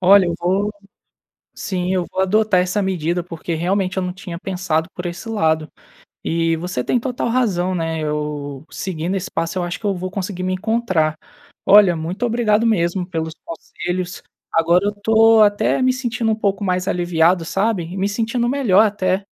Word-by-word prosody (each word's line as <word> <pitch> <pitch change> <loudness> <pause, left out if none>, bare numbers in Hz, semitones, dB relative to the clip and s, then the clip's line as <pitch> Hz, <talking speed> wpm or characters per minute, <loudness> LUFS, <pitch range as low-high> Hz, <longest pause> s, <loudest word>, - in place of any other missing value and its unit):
Olha, 190 +1 +6
eu 170 - -1
vou 195 +4 0 0.8
sim, 185 -1 -2
eu 180 -2 0
vou 190 - -1
adotar 210 0 +3
essa 185 +3 0
medida, 175 -2 -1
porque 170 -1 -5
realmente 185 +3 -1
eu 185 - +1
não 180 - -3
tinha 180 -2 -7
pensado 180 -3 -1
por 180 - -7
esse 175 +6 -7
lado 160 -8 +1 0.6
e 165 0 +1
você 165 -7 -3
tem 250 - +1
total 245 -1 -2
razão, 190 -7 +1
né, 165 -1 -2
eu 150 -1 -4
seguindo 175 0 -3
esse 185 - -4
passo, 165 +2 -2
eu - - -1
acho 175 +1 -3
que 210 - -5
eu 200 - +1
vou 185 +1 -4
conseguir 185 -1 -4
me 185 - -1
encontrar. 185 -6 0 0.5
Olha, 200 -4 +7
muito 175 +9 -3
obrigado 230 -1 +2
mesmo 180 -3 +1
pelos 160 -2 -4
conselhos. 180 +2 -5 0.3
Agora 170 +4 +3
eu 205 - +2
estou 220 +2 +4
até 205 +5 +1
me 255 0 +3
sentindo 245 -3 -1
um - - +2
pouco 200 -2 -1
mais 185 0 0
aliviado, 175 0 +2
sabe, 195 0 0
e 175 +4 -8
me 195 +1 0
sentindo 235 +3 -1
melhor 225 -7 +4
até. 195 -2 0
185 Hz, 180 wpm, -20 LUFS, 170-210 Hz, 0.8 s, Olha